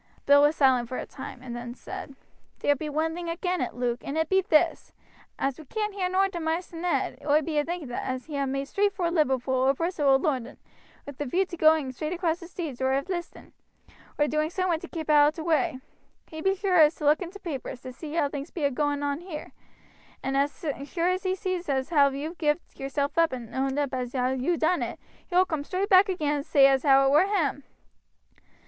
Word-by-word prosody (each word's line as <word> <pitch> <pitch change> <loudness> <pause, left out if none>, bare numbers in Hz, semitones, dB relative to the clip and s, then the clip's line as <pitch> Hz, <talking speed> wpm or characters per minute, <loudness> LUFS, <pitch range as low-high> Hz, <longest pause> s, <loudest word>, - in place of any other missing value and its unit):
Bill 285 0 +7
was 295 +2 +4
silent 255 -5 +3
for 255 - -4
a - - -4
time 260 -2 -9
and 240 -2 -6
then 240 0 -6
said: 275 +1 -8 0.4
"Ther 290 - +2
be 300 +3 -5
one 315 +2 -1
thing 340 0 -5
agin' 360 +1 -1
it, - - -3
Luke, 245 0 -1
and 280 - -4
it 320 -1 0
be 385 0 +4
this: 325 -2 +2 0.5
As 270 +1 -2
we 310 - -11
can't 425 +6 -3
hear 375 -2 -1
nowt 385 +1 +1
of 345 - -4
Maister 330 +2 -2
Ned, 350 +1 -1
oi 300 +1 +3
be 305 0 0
a - - +2
thinking 330 -5 -5
as 255 +1 -3
he 305 - -7
ha' 280 -1 0
made 275 +1 -2
straight 400 +4 +1
vor 350 -3 0
Liverpool 265 -6 +1
or 260 +1 +3
Bristol 330 -2 -1
or 270 -1 +6
London, 270 -4 -2 0.5
wi' 285 - -6
a 290 - -2
view 360 +9 +1
to 355 - -8
going 315 -4 +3
straight 305 +5 -4
across 340 -2 -1
the 340 - -10
seas 320 -8 -6
or 260 0 +2
of 275 +6 -1
'listing, 345 -2 -6 0.6
or 295 - +3
doing 305 +1 0
somewhat 355 -2 -1
to 355 - -7
keep 320 -2 -6
out 295 -1 +6
of 305 - -1
t' 320 - -5
way. 325 -3 +1 0.5
He 315 -1 -8
be 385 +3 +2
sure 365 -6 +5
to 300 -1 -8
look 300 +4 +4
in 355 - -4
t' 400 - -11
papers, 270 -8 -6
to 255 -1 -8
see 300 +3 -8
how 310 -4 +2
things 285 +2 -6
be 325 - -5
a 280 - +2
going 290 +1 -1
on 285 0 -1
here; 345 -4 -8 0.7
and 270 +1 -1
as 285 +5 -1 0.2
sure 340 +4 0
as 365 +1 0
he 375 -1 0
sees 370 -3 -3
as 265 -1 0
how 285 -4 +5
you've 295 +5 -6
gived 300 +1 -1
yourself 280 +3 -1
up 330 -1 +4
and 240 -3 -7
owed 265 +1 -1
up 285 -2 -1
as 250 0 -3
you 260 +6 +1
ha' - - -6
done 340 +3 +1
it, - - -4 0.3
he 350 - -5
will 370 +1 +6
coom 315 -5 -3
straight 375 +6 -2
back 385 +1 +6
again 300 -5 0
and 285 - -5
say 275 -2 +6
as 270 -1 +4
how 275 -1 +5
it 270 - +3
were 305 +7 +5
him." 320 -8 0
305 Hz, 240 wpm, -27 LUFS, 275-345 Hz, 0.7 s, Bill